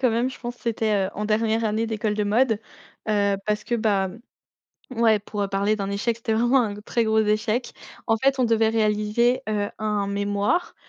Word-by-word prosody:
quand 250 -3 +3
même, 235 +3 +1
je 260 - -10
pense, 240 0 -5
c'était, 215 -4 0
heu, - - -6
en 210 - -3
dernière 220 +1 +1
année 220 +1 0
d'école 215 -1 -1
de 210 0 0
mode, 225 +1 +2 0.5
heu, 200 -2 +2
parce 210 0 0
que 240 - -1
ben 200 -2 0 0.8
ouais 225 -2 +4
pour 205 0 -3
parler 200 +2 +1
d'un 200 -1 -3
échec, 225 +3 -1
c'était 225 -1 -3
vraiment 240 +4 +3
un 205 -2 -3
très 230 +2 -1
gros 220 0 +2
échec. 215 +3 0 0.3
En 225 - +3
fait, 270 +3 +1
on 255 - +3
devait 225 -1 +3
réaliser, 220 +3 +1
heu, 210 -1 -1
un 210 -2 -1
mémoire, 205 - -1
215 Hz, 195 wpm, -24 LUFS, 205-230 Hz, 0.8 s, ouais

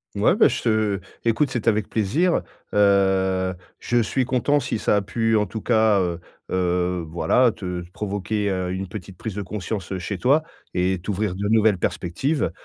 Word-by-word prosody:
Ouais - - +3
ben - - +5
je - - -3
te 110 -3 +1 0.2
écoute 120 +5 +1
c'était 120 -2 +1
avec 105 -1 0
plaisir, 135 - +1 0.3
heu, 95 -2 +3 0.3
je 120 0 +1
suis 125 +4 0
content 130 +3 +2
si 120 -2 -2
ça 105 - +2
a - - +2
pu 115 +2 +1
en 105 - +2
tout 105 +3 -6
cas, 110 -4 +3
heu 85 -1 -2 0.3
heu, 90 -1 0
voilà 115 +9 +2
te 90 -2 -5
provoquer, 105 0 -2
heu, 90 -1 -2
une 95 0 -4
petite 95 -1 -8
prise 110 -4 -5
de 105 - -3
conscience, 100 -1 -5
heu, 95 - -3
chez 95 +3 -4
toi 140 - +3 0.3
et 90 0 +1
t'ouvrir 100 0 -2
de 100 +2 -3
nouvelles 110 -2 +4
perspectives, 130 - -1
100 Hz, 180 wpm, -23 LUFS, 95-115 Hz, 0.3 s, ben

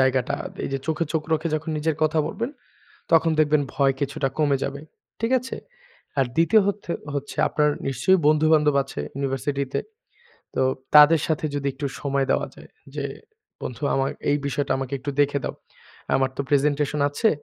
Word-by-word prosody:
জায়গাটা, 130 -1 +2 0.3
এইযে 135 - -2
চোখে 160 +1 0
চোখ 160 -1 0
রেখে 160 +1 +1
যখন 155 +1 -3
নিজের 155 0 0
কথা 155 +1 +2
বলবেন, 235 +3 -3 0.6
তখন 165 0 +5
দেখবেন 150 -1 +3
ভয় 135 -1 +3
কিছুটা 140 -1 -1
কমে 145 -3 +3
যাবে, 140 0 -4 0.4
ঠিক 230 +1 0
আছে। 255 - -6 0.6
আর 135 - +3
২য় 190 +7 +5
হত 200 0 0 0.4
হচ্ছে 140 0 -4
আপনার 150 -1 +2 0.2
নিশ্চয় 135 +8 +3
বন্ধুবান্ধব 155 -1 +4
আছে - - -6
ইউনিভার্সিটিতে, 135 0 -2 0.7
তো 130 - +1 0.3
তাদের 150 +2 +8
সাথে 160 -1 -1
যদি 140 -1 -2
একটু 140 +1 -3
সময় 140 -1 0
দেওয়া - - +1
যায় - - -15 0.3
যে, - - -2 0.6
বন্ধু 125 +3 -6
আমা 135 0 +1 0.2
এই 145 - +3
বিষয়টা 140 0 -1
আমাকে 135 -1 -5
একটু 140 +3 -4
দেখে 145 0 +2
দাও, - - -3 0.6
আমার 135 0 +1
তো - - -2
প্রেজেন্টেশন 145 +1 +2
আছে, 145 +11 +1
145 Hz, 160 wpm, -24 LUFS, 135-155 Hz, 0.7 s, তাদের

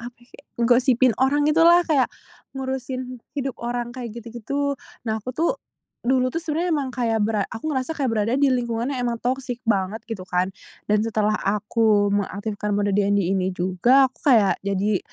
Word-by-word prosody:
apa 240 +1 -9
kayak, 245 +4 -19 0.2
gosipin 250 0 +4
orang 290 +2 +3
gitulah, 335 +3 +5
kayak 280 -6 +2 0.5
ngurusin 260 -1 -4 0.2
hidup 270 -2 -3
orang 240 0 -3
kayak 240 -3 -7
gitu-gitu. 240 +5 -3 0.3
Nah, 220 -1 -2
aku 255 +3 -7
tuh, 330 +2 +2 0.5
dulu 255 0 +1
tuh 330 - -2
sebenarnya 330 +3 -1
emang 275 -3 -1
kayak 230 -3 0
bera 210 -2 0
aku 265 +8 -5
ngerasa 265 +3 -2
kayak 270 -6 -1
berada 225 +2 0
di 275 0 +3
lingkungan 240 0 -1
yang 250 -3 -2
emang 235 -1 -3
toxic 250 0 -2
banget 210 -1 0
gitu 215 -6 -7
kan 180 +1 0 0.4
dan 210 - +4
setelah 215 -1 0
aku 210 0 +2
mengaktifkan 205 +1 -2
mode 205 0 +1
DND 200 0 +2
ini 190 -1 0
juga, 240 +10 +3
aku 235 - -29 0.2
kayak 205 -4 +3
jadi 200 0 +1
235 Hz, 170 wpm, -23 LUFS, 210-260 Hz, 0.5 s, gitulah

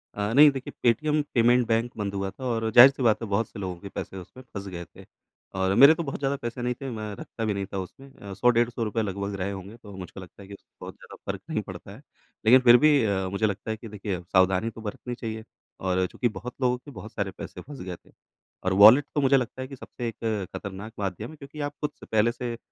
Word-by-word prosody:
अ, 105 +2 -2
नहीं 145 +3 +9
देखिए 135 -2 -7
Paytm 150 +6 +2
payment 120 +1 +4
bank 115 +1 +1
बंद 100 -1 -3
हुआ 100 0 -2
था 115 - -12
और 115 -2 0
जाहिर-सी 130 +3 +8
बात 115 -1 +3
है 115 - -4
बहुत 100 +3 0
से 105 - -10
लोगों 95 -2 -4
के 100 - -9
पैसे 95 - -6
उसमें 95 +8 -11
फँस 100 -1 -6
गए 85 -2 -6
थे - - -16 0.6
और 95 0 +2
मेरे 140 +7 +9
तो 170 - -3
बहुत 140 - -5
ज़्यादा 140 0 0
पैसे 120 +1 -5
नहीं 125 0 0
थे। 135 - -4
मैं 110 -3 -5
रखता 115 +3 -6
भी 105 - 0
नहीं 100 0 -3
था - - -2
उसमें। 135 +9 -9
अ, 100 -1 -9
100 125 +6 +3
डेढ़ 120 0 +3
100 115 -1 -4
रुपए 110 +1 -1
लगभग 100 -1 -3
रहे 95 +2 -2
होंगे 100 +3 -8
तो 105 -4 -12
मुझको 95 +1 -9
लगता 95 +1 -13
है 95 - -12
कि 100 - -9 0.3
बहुत - - -7
ज़्यादा - - -13 0.2
फ़र्क - - -9
नहीं - - -1
पड़ता - - -10
है - - -15 0.4
लेकिन 125 +4 +8
फिर 120 -1 +8
भी। 145 -1 +4
अ, 95 -3 0
मुझे 100 +3 0
लगता 105 +1 -2
है 110 - -3
कि 115 - -10
देखिए 100 -3 -4
सावधानी 95 +3 +2
तो 115 - -11
बरतनी 115 +3 -6
चाहिए 110 -2 -6 0.4
और 95 0 +1
चूँकि 120 - 0
बहुत 125 - -8
लोगों 125 0 +2
के 145 +4 -13
बहुत 105 -2 -10
सारे 100 -2 -2
पैसे 90 - -8
फस 140 +3 -11
गए 90 -1 -5
थे - - -21 0.5
और 95 0 +1
वॉलेट 125 +7 +9
तो 145 - +2
मुझे 135 0 +5
लगता 130 +1 -3
है 130 - -5
कि 135 - -9
सबसे 120 -1 -7
एक 110 -4 -3
खतरनाक 100 +3 -7
माध्यम 100 +3 -3
है 155 - -11
क्योंकि 145 +2 -11
आप 145 0 -3
खुद 150 - -1
से - - -11
पहले 110 +2 +2
से 120 -1 -5
110 Hz, 255 wpm, -26 LUFS, 100-125 Hz, 0.6 s, नहीं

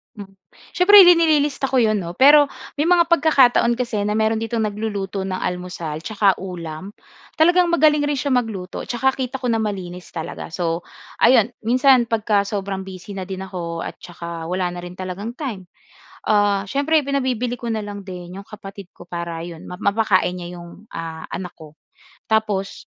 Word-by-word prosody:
Mm. 195 -2 -11 0.4
Siyempre 405 +3 +9
nililista 315 -6 +4
ko 260 -2 +2
'yon 215 -1 +2
'no. 170 -3 -5
Pero 290 +7 +7 0.3
may 295 - +1
mga 345 -1 +4
pagkakataon 270 -8 +4
kasi 235 -3 -3
na 210 - 0
meron 220 +1 +1
ditong 225 0 -2
nagluluto 205 -2 -3
ng 185 -1 -3
almusal 180 -4 -4
tsaka 205 -3 +2
ulam. 180 0 -7 0.4
Talagang 350 +3 +4
magaling 300 -2 +4
rin 290 - 0
siya 285 +1 -2
magluto 225 -8 -2
tsaka 255 +2 +1
kita 260 0 -4
ko 250 - -1
na 225 - +2
malinis 185 -5 -5
talaga. 160 -1 -6
So 170 -1 -2 0.3
ayun, 240 -3 +5 0.2
minsan 250 +1 +4
pagka 215 -3 +1
sobrang 195 -1 -4
busy 190 +1 -9
na 190 - -4
din 190 0 -6
ako 175 -3 -5
at - - -6
saka 170 -1 -8
wala 180 +1 -1
na 175 0 -7
rin 175 - -8
talagang 185 +5 -6
time, 245 - -6 0.6
ah, 205 -2 +2
siyempre 285 +8 +1
pinabibili 255 -3 -1
ko 235 - -4
na 220 -2 -2
lang 205 0 -7
din 180 -2 -9
'yong 200 - -16
kapatid 200 -2 -10
ko - - -12
para 170 -1 -5
'yon 170 -2 -10
ma 180 - -7
mapakain 200 -2 +1
niya 180 0 -7
'yong, 175 +5 -13
ah, 165 -1 -6
anak 180 -1 -6
ko. 155 -2 -15 0.5
Tapos 215 -3 -1
205 Hz, 170 wpm, -21 LUFS, 180-250 Hz, 0.6 s, Siyempre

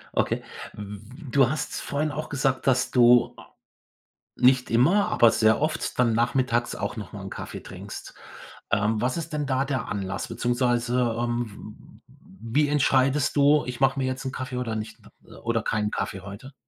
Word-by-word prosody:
Okay, - - 0 0.3
w 105 -1 -8 0.3
du 135 -1 +4
hast 155 - -3
vorhin 150 +2 -2
auch 155 +1 -5
gesagt, 135 -2 -1
dass 130 -1 +2
du 120 -1 +5 1.0
nicht 125 0 +3
immer, 155 - +3
aber 115 -1 +5
sehr 110 0 +3
oft 155 +1 -2
dann 120 -2 +3
nachmittags 120 +1 +1
auch - - -4
noch 105 -6 -7
mal 100 - -8
'n 95 - -7
Kaffee - - -7
trinkst. - - -9 0.6
Ähm, 105 +1 +2
was 125 +6 0
ist 165 0 -6
denn 150 -1 -1
da 135 0 0
der 130 -3 -2
Anlass? 100 -1 -3
Beziehungsweise, 120 -1 0
ähm, 120 -3 -5
w 115 +8 -4
wie - - 0
entscheidest 135 0 +2
du: 145 +1 +5
„Ich 125 -1 -5
mache 135 0 +3
mir 130 - 0
jetzt 130 +2 -3
'n 130 - -3
Kaffee 130 -1 -5
oder 120 -3 -2
nicht 110 0 -5 0.5
oder 115 -1 0
keinen 105 -1 -1
Kaffee 95 - -3
heute?“ 100 +8 -10
125 Hz, 170 wpm, -25 LUFS, 115-135 Hz, 1.0 s, du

